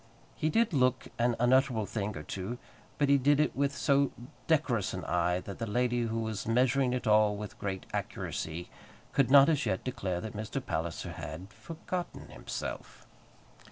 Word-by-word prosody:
He 155 Hz, -, 0 dB
did 225 Hz, +2 st, +2 dB
look 130 Hz, -2 st, +2 dB
an 120 Hz, 0 st, +2 dB
unutterable 125 Hz, -2 st, +3 dB
thing 105 Hz, -2 st, -3 dB
or 75 Hz, -, -6 dB
two; 95 Hz, +9 st, -5 dB, 0.4 s
but 145 Hz, -, +2 dB
he 140 Hz, 0 st, +5 dB
did 145 Hz, +2 st, +4 dB
it 150 Hz, -, +2 dB
with 140 Hz, 0 st, 0 dB
so 140 Hz, -1 st, +3 dB, 0.4 s
decorous 130 Hz, -, +1 dB
an 90 Hz, -, -5 dB
eye, 90 Hz, +1 st, +1 dB
that 100 Hz, -, -8 dB
the 115 Hz, -, -2 dB
lady, 120 Hz, +2 st, +1 dB
who 115 Hz, 0 st, -2 dB
was 110 Hz, -2 st, -4 dB
measuring 125 Hz, +2 st, +3 dB
it 125 Hz, 0 st, -2 dB
all 105 Hz, -1 st, +4 dB
with 105 Hz, 0 st, -7 dB
great 95 Hz, -2 st, -3 dB
accuracy, 80 Hz, +2 st, -4 dB, 0.4 s
could 135 Hz, -3 st, +3 dB
not, 140 Hz, 0 st, +8 dB
as 155 Hz, -2 st, +1 dB
yet, 95 Hz, -, -1 dB
declare 100 Hz, -9 st, -2 dB
that 110 Hz, +3 st, -6 dB
Mr. 110 Hz, +6 st, -3 dB
Palliser 85 Hz, -8 st, -3 dB
had 95 Hz, +8 st, -7 dB
"forgotten 175 Hz, +2 st, -6 dB
himself." -, -, -6 dB
120 Hz, 170 wpm, -31 LUFS, 100-140 Hz, 0.4 s, not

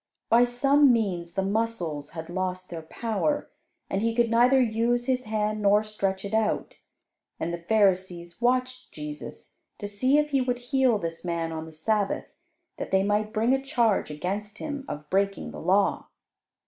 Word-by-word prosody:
By 235 Hz, +2 st, +6 dB
some 275 Hz, +3 st, +4 dB
means 185 Hz, -7 st, -1 dB
the 195 Hz, -, 0 dB
muscles 190 Hz, -8 st, -2 dB
had 160 Hz, 0 st, -5 dB
lost 185 Hz, +1 st, -3 dB
their 165 Hz, -1 st, -5 dB
power, 225 Hz, -, -2 dB, 0.4 s
and 195 Hz, -, -1 dB
he 230 Hz, 0 st, 0 dB
could 235 Hz, -1 st, +2 dB
neither 245 Hz, +3 st, +5 dB
use 240 Hz, 0 st, +1 dB
his 255 Hz, -1 st, 0 dB
hand 215 Hz, 0 st, -1 dB
nor 205 Hz, +1 st, +4 dB
stretch 195 Hz, -2 st, -2 dB
it 200 Hz, -, -6 dB
out. 220 Hz, -1 st, 0 dB, 0.6 s
And 170 Hz, -, -2 dB
the 170 Hz, -, -3 dB
Pharisees 185 Hz, -2 st, +1 dB
watched 255 Hz, +1 st, 0 dB
Jesus, 150 Hz, -1 st, -8 dB, 0.2 s
to 205 Hz, -, -5 dB
see 255 Hz, +8 st, +2 dB
if 300 Hz, 0 st, +1 dB
He 275 Hz, -2 st, +3 dB
would 250 Hz, -1 st, 0 dB, 0.2 s
heal 260 Hz, -4 st, +4 dB
this 165 Hz, -3 st, -5 dB
man 170 Hz, -2 st, -2 dB
on 160 Hz, 0 st, -5 dB
the -, -, -10 dB
Sabbath, 200 Hz, +6 st, -1 dB, 0.5 s
that -, -, -5 dB
they 190 Hz, 0 st, +3 dB
might 210 Hz, +1 st, 0 dB
bring 230 Hz, +3 st, +2 dB
a 270 Hz, -, +1 dB
charge 240 Hz, -, +1 dB
against 200 Hz, +7 st, -4 dB
Him 285 Hz, -3 st, -5 dB
of 150 Hz, 0 st, -6 dB
breaking 195 Hz, +1 st, 0 dB
the -, -, -8 dB
law. 195 Hz, +2 st, +2 dB
210 Hz, 175 wpm, -26 LUFS, 185-240 Hz, 0.6 s, By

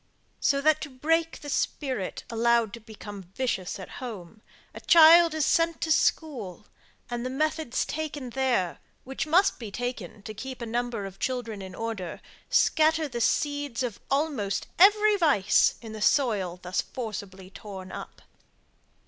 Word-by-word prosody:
So 275 Hz, -1 st, +2 dB
that 310 Hz, +1 st, +3 dB
to 300 Hz, -, -5 dB
break 325 Hz, +5 st, 0 dB
the 295 Hz, -, -9 dB
spirit, 260 Hz, -9 st, -2 dB
allowed 230 Hz, -1 st, +2 dB
to 235 Hz, -, -7 dB
become 210 Hz, -2 st, -10 dB
vicious 215 Hz, -8 st, -2 dB
at 190 Hz, -, -8 dB
home, 215 Hz, -4 st, -8 dB, 0.3 s
a -, -, -9 dB
child 335 Hz, 0 st, +7 dB
is 310 Hz, -3 st, +1 dB
sent 335 Hz, -1 st, +2 dB
to 320 Hz, -, -1 dB
school; 265 Hz, -, 0 dB, 0.5 s
and 240 Hz, 0 st, -3 dB
the 255 Hz, -, -2 dB
methods 310 Hz, -1 st, -1 dB
taken 295 Hz, -5 st, -5 dB
there, 245 Hz, -9 st, 0 dB, 0.2 s
which 270 Hz, +4 st, -4 dB
must 360 Hz, +6 st, +3 dB
be 225 Hz, -4 st, -6 dB
taken 220 Hz, -3 st, -5 dB
to 215 Hz, -, -7 dB
keep 260 Hz, +4 st, -7 dB
a 235 Hz, -, -4 dB
number 235 Hz, -2 st, -2 dB
of 195 Hz, 0 st, -9 dB
children 240 Hz, -5 st, -3 dB
in 190 Hz, -1 st, -8 dB
order, 225 Hz, -6 st, -5 dB, 0.3 s
scatter 315 Hz, 0 st, +3 dB
the 240 Hz, -3 st, -5 dB
seeds 285 Hz, -1 st, 0 dB
of 235 Hz, -5 st, -4 dB
almost 275 Hz, -9 st, -1 dB
every 420 Hz, +2 st, +6 dB
vice 275 Hz, -, +3 dB
in 220 Hz, -1 st, -8 dB
the 215 Hz, -, -7 dB
soil 205 Hz, -, +2 dB
thus 180 Hz, +1 st, -1 dB
forcibly 195 Hz, -5 st, -7 dB
torn 190 Hz, -2 st, -9 dB
up. -, -, -9 dB
245 Hz, 155 wpm, -27 LUFS, 205-305 Hz, 0.5 s, child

